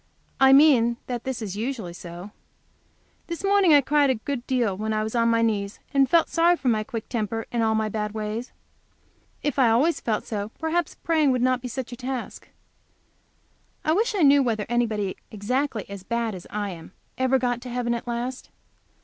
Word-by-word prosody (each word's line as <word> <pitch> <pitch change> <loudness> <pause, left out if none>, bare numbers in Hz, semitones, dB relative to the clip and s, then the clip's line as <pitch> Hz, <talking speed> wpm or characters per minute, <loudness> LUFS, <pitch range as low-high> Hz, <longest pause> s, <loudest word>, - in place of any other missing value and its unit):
I 265 0 +7
mean 265 -5 +6
that 245 -2 -5
this 260 -3 -3
is 200 -2 -5
usually 220 -5 -4
so. 175 +3 -9 1.0
This 335 +1 -5
morning 395 -3 +4
I 290 -1 +7
cried 285 +1 +3
a 260 - +3
good 245 +2 -5
deal 240 -7 +1
while 215 +2 -2
I 215 - 0
was 220 - -4
on 230 -1 +2
my 230 0 +3
knees, 205 -3 -1
and 275 -2 +4
felt 335 +2 +4
sorry 340 +1 +3
for 260 -3 0
my 215 -2 +1
quick 225 0 -6
temper 225 -1 -3
and 235 - 0
all 220 -1 +2
my 220 0 +1
bad 210 0 -3
ways. 220 +3 -4 0.9
If 290 -2 -1
I 250 -3 +5
always 280 +9 +3
felt 220 -3 -2
so, 210 -1 -4
perhaps 320 +1 -1
praying 315 -4 +1
would 250 -1 0
not 255 0 +2
be 250 - -5
such 250 0 -5
a - - -5
task. 255 0 -6 1.4
I 310 - +3
wish 435 +5 +1
I 370 - +2
knew 280 0 +6
whether 225 -5 -1
anybody 220 -5 -1
exactly 230 +2 -2
as 200 -1 -8
bad 235 +2 -2
as 180 -2 -9
I 205 -1 -3
am 170 +1 -11 0.3
ever 260 +1 +3
got 245 -1 -1
to 250 - -8
heaven 240 -1 -1
at 235 +1 -5
last. 245 +2 -4
240 Hz, 200 wpm, -25 LUFS, 215-270 Hz, 1.4 s, I